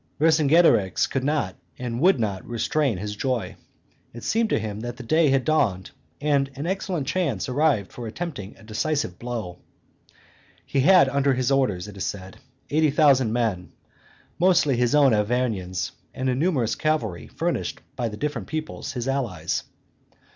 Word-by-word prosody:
Vercingetorix 155 - +4
could 135 - -2
not 140 -10 0 0.2
and 120 0 -4
would 180 -5 +5
not 100 -4 -2
restrain 120 +1 0
his 105 +2 -5
joy; 125 0 -2 0.6
it 120 - -9
seemed 225 0 +1
to - - +2
him 105 -1 -4
that 120 +1 -6
the 130 - -8
day 155 +5 +3
had 135 -1 +2
dawned 100 - +1 0.3
and 140 -2 +1
an 140 +3 -5
excellent 185 -4 -2
chance 145 - -1
arrived 135 -6 +1
for 120 -2 -7
attempting 115 - -6
a - - -17
decisive 110 - -2
blow. 115 -8 -5 1.1
He 140 - -1
had 180 +2 +6
under 140 0 +2
his 130 +1 0
orders, 105 -9 +1
it 105 -1 -10
is 95 - -3
said, 95 -1 -7 0.3
eighty 155 +1 +3
thousand 135 -5 +4
men, 110 -7 -1 0.7
mostly 175 -6 +4
his 120 +3 +2
own 140 -5 +5
Arvernians, 105 -4 -1 0.2
and 130 0 -1
a - - +2
numerous 135 -5 +1
cavalry 120 - -1
furnished - - -2 0.2
by 120 - -2
the 105 - -8
different 150 +3 -3
peoplets 155 -3 -5
his 125 -1 -4
allies. 135 -8 -2
130 Hz, 160 wpm, -24 LUFS, 110-150 Hz, 1.1 s, had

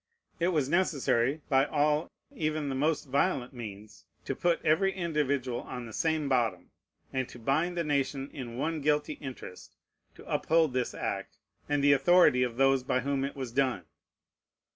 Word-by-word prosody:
It 170 - +2
was 155 -7 +1
necessary, 145 -5 +1
by 135 0 +4
all, 150 +1 +1 0.2
even 155 -2 -2
the - - -2
most 150 +4 0
violent 130 -1 0
means, 105 -3 -9 0.2
to - - -2
put 175 -1 +1
every 185 +5 +3
individual 140 -8 -1
on 125 -1 -7
the 110 - -10
same 160 +1 0
bottom, 125 -4 0 0.4
and 130 -2 -1
to - - -11
bind 155 +9 0
the 170 - +1
nation 140 -2 -1
in 120 -4 -7
one 155 +3 -2
guilty 150 +1 +1
interest 130 -9 -9 0.4
to - - -14
uphold 160 -4 +2
this 125 -1 -1
act, - - -4 0.3
and 145 -1 +1
the 145 0 +6
authority 140 -2 +5
of 120 -2 -1
those 135 0 +4
by 125 0 0
whom 140 +1 -1
it 140 - -4
was 130 -4 -5
done. 125 -8 0
140 Hz, 165 wpm, -29 LUFS, 125-155 Hz, 0.4 s, the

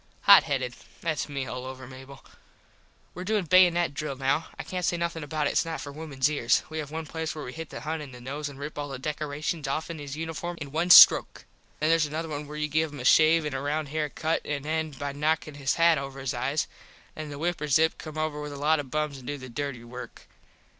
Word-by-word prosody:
Hot - - +9
headed. - - -1 0.3
Thats 160 -3 -2
me 140 -2 -3
all 125 0 -5
over. 130 0 -8 1.3
Were 180 - -6
doin 205 -1 0
baynut 175 -2 +5
drill 145 -1 -4
now. 135 +4 0
I - - -5
cant 180 -1 -4
say 175 - +1
nothin 170 -2 -2
about 150 0 -2
it. - - +1
Its - - +2
not 165 -1 -4
for 140 - -7
wimens 145 -3 -1
ears. 145 -6 +2
We 155 - -3
have 150 -2 -5
one 160 +1 -5
place 160 0 -4
where 150 - -6
we 125 - -7
hit 165 -1 -7
the - - -8
Hun 160 +1 -3
in 145 -3 -8
the 125 - -11
nose 145 +4 -5
an 140 - -11
rip 145 +1 -6
all 145 0 -4
the 135 - -5
decorashuns 150 +2 -3
offen 160 +3 -3
his 145 0 -6
uniform 165 +2 -4
all 150 - -4
in - - -14
one 165 +4 0
stroke. - - +8 0.3
Then 155 - +1
theres 165 -2 +3
another 160 +2 -4
where 150 0 -8
you 150 0 -1
give 155 +1 0
him 145 - -9
a 125 - -6
shave 160 +3 +5
an 150 - -3
a 135 - -2
round 145 +1 -2
hair 150 0 -1
cut 160 +3 -1
an 145 -1 -4
end 155 -2 -2
by 145 -1 -3
knocking 150 +1 -1
his 140 -1 -1
hat 165 -2 +4
over 135 0 -7
his 135 0 -2
eyes. 135 +5 -1 0.5
Then 155 -1 -7
the 145 - -7
wiperzup 160 -1 +1
come 155 -1 -8
over 155 -1 -2
with 150 0 -6
a - - -7
lot 150 +2 +2
of 140 -3 -5
bums 150 -1 -2
an 125 - -13
do 145 - -3
the 130 -2 -9
dirty 130 -1 -4
work. 125 +1 -10
150 Hz, 240 wpm, -27 LUFS, 140-160 Hz, 1.3 s, Hot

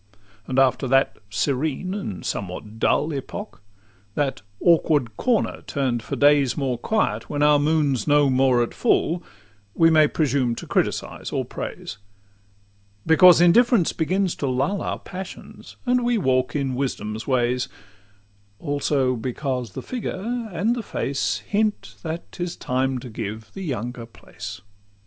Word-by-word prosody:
IV 100 -1 -33 0.3
And 130 - -2
after 135 0 +3
that 135 +1 +2
serene 140 - -1
and 150 - -5
somewhat 105 +1 -5
dull 150 +7 +2
Epoch, 145 - -6 0.5
that 145 -2 -1 0.2
awkward 150 -9 +3
corner 240 - 0
turn'd 130 -5 -1
for - - -4
days 145 -3 +4
More 130 -4 -1
quiet, 220 - 0
when 145 0 0
our 150 0 +5
moon's 145 -5 +1
no 145 -1 +5
more 130 -2 +3
at 120 - -5
full, 170 +2 +1 0.5
We 165 0 +5
may 155 -1 +6
presume 135 -6 0
to - - -7
criticise - - -2
or - - -1
praise; - - -7 1.1
Because 175 +2 +7
indifference 210 +2 +5
begins 185 +3 0
to 140 - -2
lull 135 +10 0
Our - - -2
passions, 185 0 -9
and 250 0 +2
we 240 -1 +2
walk 130 -8 +1
in 135 -3 -1
wisdom's 115 -4 -3
ways; 125 -1 +1 0.9
Also 145 -3 0
because 125 -1 -3
the - - -6
figure 235 -1 -4
and 210 +7 +1
the 240 - -3
face 105 - -2
Hint, 210 0 0
that 165 0 -5
't 175 - -5
is 175 - -4
time 130 +1 -1
to 125 0 -8
give 110 0 -6
the 195 - -7
younger 120 -4 -4
place. 105 -3 -9
140 Hz, 145 wpm, -23 LUFS, 125-170 Hz, 1.1 s, Because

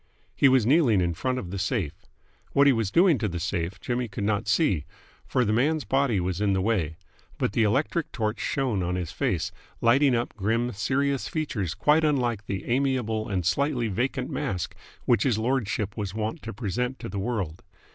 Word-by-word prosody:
He 135 - +5
was 130 -4 +4
kneeling 130 - +4
in 85 -1 +1
front 130 +9 -1
of 90 -8 -5
the 100 - -3
safe. 95 - -1 0.6
What 140 - +5
he 140 - +6
was 115 -4 0
doing 170 - +4
to 110 - 0
the 85 -3 -4
safe, 85 +3 -2
Jimmy 120 +3 -2
could 100 -1 -5
not 105 0 0
see, 100 - +2 0.4
for 125 -2 +1
the 105 - +1
man's 150 +6 +2
body 130 -2 +2
was 90 +1 -2
in 100 -2 +2
the 95 - +1
way; 90 -7 0 0.4
but - - 0
the 115 - +2
electric 140 +9 +1
torch 110 -1 -2
shone 125 -8 0
on 90 +1 -1
his 90 -2 -3
face, 90 -1 -1 0.3
lighting 130 +3 +4
up 120 0 -2
grim, 115 +4 0
serious 135 +6 0
features 115 - -2
quite 150 +2 +3
unlike 120 -8 0
the 95 -1 -3
amiable 120 -4 0
and 95 -4 -1
slightly 130 - +1
vacant 125 +5 -2
mask 90 -3 -2 0.3
which 120 - +3
his 125 -6 +2
lordship 110 -4 -1
was 100 -2 -4
wont 110 +8 -3
to 115 - -6
present 125 +4 -2
to - - -7
the 100 +1 -4
world. 95 -6 -3
115 Hz, 195 wpm, -26 LUFS, 100-130 Hz, 0.6 s, he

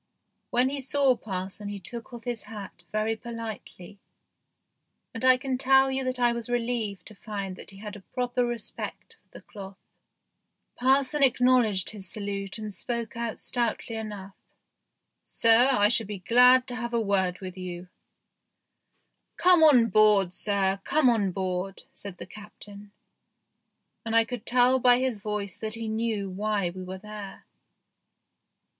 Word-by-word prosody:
When 250 +2 +2
he 280 0 -4
saw 270 0 +3
parson 195 -1 -6
he 205 - -5
took 230 +6 -7
off 240 -1 -9
his 240 -3 -4
hat 200 -5 -10
very 215 +1 0
politely, 220 -4 -9 1.1
and 225 - -5
I 255 0 +6
can 260 0 -3
tell 265 0 +4
you 265 0 -1
that 255 0 -1
I 240 -1 +3
was 235 0 -5
relieved 235 -4 -2
to - - -11
find 200 -3 -6
that - - -11
he 195 - -13
had 210 +1 -8
a - - -9
proper 245 +3 -2
respect 240 -2 -5
for - - -43
the - - -14
cloth. 195 -2 -10 1.0
Parson 270 +3 +2
acknowledged 250 -7 +3
his 195 -4 -8
salute 200 -1 -4
and 215 -2 -6
spoke 235 +1 -3
out 235 -1 -4
stoutly 235 -2 -1
enough. 205 -3 -7 0.6
" - - -55
Sir, 230 +3 +4
I 205 -6 +4
should 225 -1 +2
be 205 -1 -5
glad 250 +6 +5
to 245 - -5
have 235 +1 -4
a - - +2
word 190 -4 0
with 185 -1 -8
you." 180 -1 -7 0.8
" - - -51
Come 360 -2 +5
on 265 -7 +7
board, 205 -3 +4
sir; 195 -1 0
come 290 -5 +3
on 205 -5 0
board," 185 0 -4
said 200 -3 -9
the - - -8
Captain, 205 0 -13 1.1
and 225 0 -3
I 230 0 +5
could 245 -3 -7
tell 250 +1 +4
by 245 -1 +5
his 255 -4 -1
voice 205 -2 -4
that 220 0 -2
he 225 0 -5
knew 220 -2 -2
why 200 -1 -1
we 185 +1 -9
were 185 +1 -7
there. 210 0 -10
220 Hz, 160 wpm, -27 LUFS, 200-245 Hz, 1.1 s, on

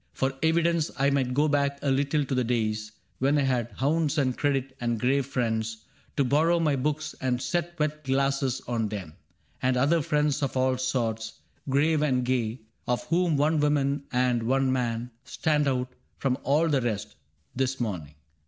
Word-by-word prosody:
For 135 0 0
evidence, 165 0 +2
I 140 +1 +3
might 130 -2 0
go 150 +2 +3
back 140 -1 +1
a 140 - +2
little 140 +2 +1
to 135 - -3
the 125 -1 +2
days 110 -2 -1 0.3
When 140 +3 +3
I 145 - +2
had 125 -3 0
hounds 150 +5 0
and 130 -4 +1
credit, 135 -2 -1
and 120 -2 0
grave 135 +2 +1
friends 110 -4 -2 0.3
To 140 - +4
borrow 160 +6 +3
my 155 -4 +2
books 150 +3 -2
and 125 -2 0
set 175 +4 -2
wet 155 -1 -2
glasses 135 -1 0
on 115 -3 -1
them. 95 -7 -6 0.5
And 130 0 +2
other 150 +6 +3
friends 150 0 +1
of 135 -2 -1
all 130 0 +2
sorts, 115 -4 -2 0.3
grave 150 +3 +3
and 130 -4 +1
gay. 120 -2 -1 0.3
Of 125 0 0
whom 170 -2 +2
one 150 +2 +2
woman 145 -1 +1
and 125 -1 +2
one 130 +3 +1
man 120 -1 -2
stand 150 +3 0
out 125 -1 -1 0.2
From 130 -2 0
all 150 +4 +2
the 140 -4 +2
rest, 110 -3 -3 0.4
this 130 0 -1
morning. 90 - -4
135 Hz, 175 wpm, -27 LUFS, 125-150 Hz, 0.5 s, To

